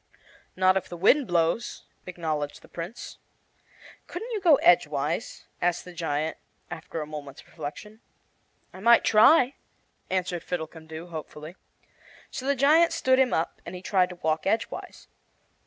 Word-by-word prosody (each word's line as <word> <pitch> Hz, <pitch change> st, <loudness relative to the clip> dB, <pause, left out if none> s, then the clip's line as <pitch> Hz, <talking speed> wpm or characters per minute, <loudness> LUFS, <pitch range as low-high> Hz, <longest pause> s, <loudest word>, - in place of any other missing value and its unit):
"Not 185 Hz, 0 st, +4 dB
if 190 Hz, -, -4 dB
the 175 Hz, -, -7 dB
wind 255 Hz, -, +4 dB
blows," 170 Hz, +6 st, 0 dB, 0.2 s
acknowledged 155 Hz, -5 st, -4 dB
the -, -, -15 dB
Prince. 175 Hz, +8 st, -8 dB, 0.9 s
"Couldn't 475 Hz, +2 st, -6 dB
you 430 Hz, -3 st, -2 dB
go 335 Hz, -5 st, +7 dB
edgewise?" 155 Hz, -, +1 dB, 0.2 s
asked 175 Hz, 0 st, 0 dB
the 180 Hz, -, -10 dB
giant 160 Hz, -2 st, -2 dB, 0.3 s
after 160 Hz, 0 st, -6 dB
a -, -, -4 dB
moment's 150 Hz, -2 st, -9 dB
reflection. 210 Hz, +8 st, -9 dB, 0.7 s
"I 185 Hz, -, -10 dB
might 235 Hz, +4 st, +5 dB
try," 250 Hz, +5 st, +5 dB, 0.6 s
answered 180 Hz, -2 st, -1 dB
Fiddlecumdoo, 160 Hz, 0 st, -6 dB
hopefully. 155 Hz, 0 st, -8 dB, 0.8 s
So 260 Hz, -, -5 dB
the 280 Hz, -, +2 dB
giant 310 Hz, +6 st, +4 dB
stood 260 Hz, 0 st, +2 dB
him 260 Hz, -2 st, +3 dB
up, 160 Hz, -, -2 dB
and -, -, -8 dB
he 180 Hz, -, -9 dB
tried 185 Hz, -2 st, +2 dB
to 180 Hz, -, -8 dB
walk 160 Hz, -1 st, -1 dB
edgewise. 220 Hz, +3 st, -3 dB
175 Hz, 140 wpm, -26 LUFS, 160-230 Hz, 0.9 s, go